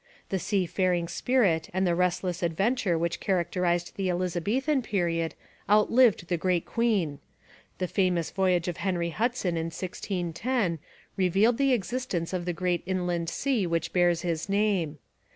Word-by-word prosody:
The 190 - -1
sea 195 0 0
faring 175 -1 0
spirit 185 -6 +1
and 190 0 +2
the 175 - +2
restless 180 0 0
adventure 195 +3 +1
which 170 +1 -1
characterized 175 -1 0
the 195 -2 0
Elizabethan 200 - 0
period 170 -7 -1 0.3
outlived 215 -2 +4
the 175 - 0
great 180 0 0
queen. 200 - 0 0.6
The 185 - -1
famous 180 -3 0
voyage 185 -3 +1
of 175 -1 -3
Henry 175 -2 -1
Hudson 220 -4 -1
in 165 - -1
1610 180 +3 -2 0.4
revealed 195 +6 +3
the 275 -1 +4
existence 195 -5 -2
of 180 -2 -2
the 180 - 0
great 180 0 0
inland 175 -3 -1
sea 250 -9 0
which 165 -1 -1
bears 175 -2 +3
his 170 +1 -2
name. 195 -7 +1
180 Hz, 145 wpm, -27 LUFS, 170-205 Hz, 0.6 s, outlived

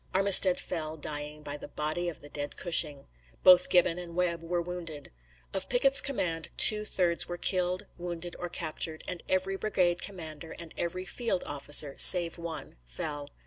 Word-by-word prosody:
Armistead 190 -1 +7
fell, 155 -1 -6
dying, 150 0 -8
by 145 0 -8
the - - -11
body 155 +4 -4
of 165 - -10
the 145 - -14
dead 145 0 -7
Cushing. 155 -5 0 0.4
Both 180 -1 +6
Gibbon 180 -1 +2
and 170 -1 -10
Webb 175 -2 -2
were 175 +1 -3
wounded. 170 -4 -8 0.4
Of 190 - -3
Pickett's 270 +3 +4
command 170 - -4
two 215 0 +7
thirds 175 -4 0
were 175 - -7
killed, 185 +2 -2
wounded 175 0 -7
or 175 - -6
captured, 160 -1 -5
and 180 -2 -7
every 190 +1 -2
brigade 180 -4 -1
commander 160 -5 -8
and 170 -2 -12
every 185 +2 -5
field 230 0 -4
officer, 145 0 0
save 170 -2 +7
one, 165 - -9
fell. 145 - -7
170 Hz, 165 wpm, -28 LUFS, 155-180 Hz, 0.4 s, Armistead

